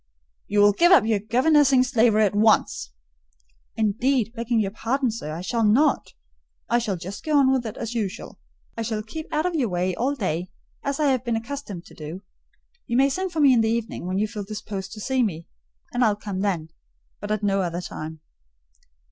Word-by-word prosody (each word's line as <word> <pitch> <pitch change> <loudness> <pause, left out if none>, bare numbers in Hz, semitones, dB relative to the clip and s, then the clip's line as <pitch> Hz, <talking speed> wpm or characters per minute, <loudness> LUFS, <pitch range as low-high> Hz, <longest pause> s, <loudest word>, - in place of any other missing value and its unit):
"You 205 0 +2
will 205 0 +6
give 345 - +4
up 305 - +7
your 220 -2 +2
governessing 260 +4 +4
slavery 225 -3 +3
at 200 - 0
once." 210 - +2 0.9
"Indeed, 225 +2 +1
begging 235 0 0
your 200 -2 0
pardon, 245 +4 -1
sir, 215 -9 -6
I 160 +2 -5
shall 225 +5 -1
not. 230 +9 +2 0.5
I 240 - +2
shall 215 -5 -2
just 180 +3 -8
go 310 -2 +2
on 265 -2 +5
with 255 -3 0
it 215 - -7
as 230 0 -4
usual. 210 -5 -4 0.4
I 230 - -4
shall 220 -1 -2
keep 310 +9 -8
out 310 +2 0
of 360 - 0
your 270 -9 0
way 180 +1 0
all 260 +9 -1
day, 180 - -2 0.3
as 280 +1 -3
I 295 -2 +3
have 255 -2 0
been 235 -2 -1
accustomed 225 -6 -6
to - - -15
do: 160 +5 -8 0.6
you 235 - 0
may 275 +1 +5
send 375 +6 -2
for 320 -2 -1
me 275 -3 +7
in 235 - +4
the 220 - +1
evening, 225 -5 -3
when 185 +1 -1
you 210 +2 +1
feel 210 -1 -6
disposed 200 -2 -6
to 215 - -9
see 260 +4 0
me, 170 -8 -2 0.5
and 245 0 +2
I'll 215 -3 +3
come 205 -2 -5
then; 180 -6 -1 0.5
but 205 - -6
at 215 0 -1
no 195 -1 +2
other 175 -1 -2
time." 160 -2 -7
220 Hz, 205 wpm, -24 LUFS, 195-255 Hz, 0.9 s, up